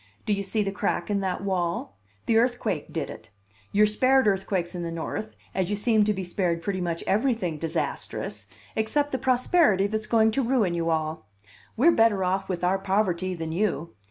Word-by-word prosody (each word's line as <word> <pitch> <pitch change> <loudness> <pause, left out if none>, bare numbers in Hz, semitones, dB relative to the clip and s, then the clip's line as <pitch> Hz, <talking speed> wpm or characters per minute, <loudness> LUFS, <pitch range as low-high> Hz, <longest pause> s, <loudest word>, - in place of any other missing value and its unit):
Do 210 - +1
you 200 - -1
see 205 +2 0
the 195 - -2
crack 200 -2 -1
in 200 - +1
that 190 -1 -2
wall? 175 - -2 0.3
The 225 -1 +4
earthquake 235 - -1
did 160 -4 -2
it. 110 - -12 0.4
You're 210 +1 +5
spared 255 +5 +3
earthquakes 190 -3 0
in 175 - -4
the 170 - -3
North, 165 +6 -5 0.2
as 190 -1 -1
you 205 - 0
seem 215 0 +3
to 210 - +2
be 190 -1 -4
spared 175 -2 -1
pretty 190 -1 -2
much 170 -1 -2
everything 210 - 0
disastrous 165 0 -3 0.3
except 290 +7 0
the 260 - -1
prosperity 255 - +3
that's 215 +1 -2
going 220 -1 +4
to 270 - +1
ruin 235 -8 +1
you 165 -1 -1
all. 155 -6 -2 0.5
We're 310 +9 +6
better 225 - +3
off 190 +2 -1
with 180 -2 -3
our 185 +2 +2
poverty 190 -2 0
than 165 -1 -4
you. 170 - -1
195 Hz, 190 wpm, -26 LUFS, 175-220 Hz, 0.5 s, We're